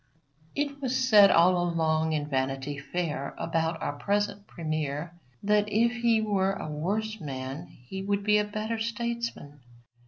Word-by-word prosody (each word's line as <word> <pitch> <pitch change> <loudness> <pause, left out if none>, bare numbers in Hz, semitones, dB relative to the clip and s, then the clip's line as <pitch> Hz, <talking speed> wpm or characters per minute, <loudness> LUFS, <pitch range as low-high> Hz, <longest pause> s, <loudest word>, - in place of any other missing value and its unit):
It 285 -1 -2
was 260 -1 0
said 215 -6 +7
long 175 0 +4
ago 160 -1 +1
in - - -7
Vanity 135 +1 -2
Fair 150 -2 -3
about 165 0 -1
our - - -1
present 205 0 -1
Premier 155 -1 -3 0.3
that 210 +1 +2
if 230 +3 +3
he 230 -2 +4
were 195 -2 +1
a 195 - -5
worse 205 +9 -2
man 135 +2 -5
he 130 +11 -9
would 200 +1 -1
be 210 0 +4
a - - +2
better 215 +2 -3
statesman. 230 -9 -3
190 Hz, 150 wpm, -28 LUFS, 155-215 Hz, 0.3 s, said